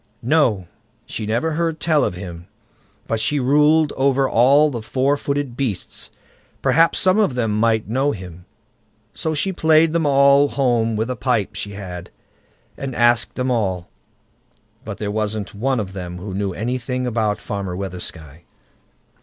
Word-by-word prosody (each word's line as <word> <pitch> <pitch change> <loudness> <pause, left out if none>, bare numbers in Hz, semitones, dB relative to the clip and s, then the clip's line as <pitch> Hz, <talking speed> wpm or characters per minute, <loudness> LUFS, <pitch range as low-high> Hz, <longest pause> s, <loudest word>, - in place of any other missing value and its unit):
"No! 115 - +2 0.4
she 110 - -5
never 120 +9 0
heard 165 0 -1
tell 155 -2 +2
of - - -1
him, 90 -2 -8 0.6
but 115 - -1
she 145 +6 +1
ruled 150 +3 +3
over 135 0 +2
all 140 +6 +4
the 120 -4 -4
four 135 +5 +1
footed 140 -3 -3
beasts; 125 -8 -3 0.5
perhaps 165 +1 +4
some 185 +3 +3
of 200 -12 +2
them 115 -4 0
might 110 -1 +2
know 135 +6 +1
him." 90 -4 -9 0.7
So 160 -1 -2
she 190 +6 -1
played 160 -1 +4
them 165 -3 +1
all 140 0 +5
home 120 -5 +1
with 110 +4 -1
a - - -2
pipe 110 -2 0
she 100 0 -5
had, 90 -3 -7 0.7
and 135 -2 -5
asked 120 -1 +2
them 130 0 -1
all, 95 -7 -1 0.9
but 105 -2 -6
there 105 -1 -3
wasn't 105 -1 -3
one 130 +5 0
of 95 -3 -4
them 90 -2 -6
who 95 +2 -7
knew 100 0 -2
anything 125 +4 -3
about 110 -4 0
Farmer 100 -3 -4
Weathersky. 85 -4 -7
120 Hz, 155 wpm, -20 LUFS, 100-140 Hz, 0.9 s, all